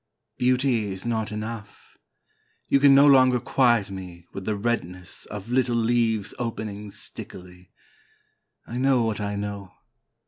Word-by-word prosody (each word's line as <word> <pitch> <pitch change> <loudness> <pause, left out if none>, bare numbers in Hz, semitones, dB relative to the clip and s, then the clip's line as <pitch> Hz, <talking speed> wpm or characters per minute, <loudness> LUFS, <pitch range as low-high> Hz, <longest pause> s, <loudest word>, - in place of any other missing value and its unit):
Beauty 125 -4 +1
is 95 +2 -7
not 110 -2 -1
enough. 105 0 -7 0.7
You 140 - +3
can 140 0 +7
no 140 +1 +7
longer 130 -3 +6
quiet 120 -6 +2
me 90 -3 -9
with 95 - -7
the 110 - -1
redness 95 -5 -4
Of 105 +1 -8
little 125 -1 +2
leaves 115 -3 +1
opening 105 -3 -5
stickily. 90 -2 -10 1.0
I 120 - -5
know 130 -2 +3
what 110 -2 -2
I 105 0 -2
know. 100 -2 -5
110 Hz, 135 wpm, -25 LUFS, 100-120 Hz, 1.0 s, can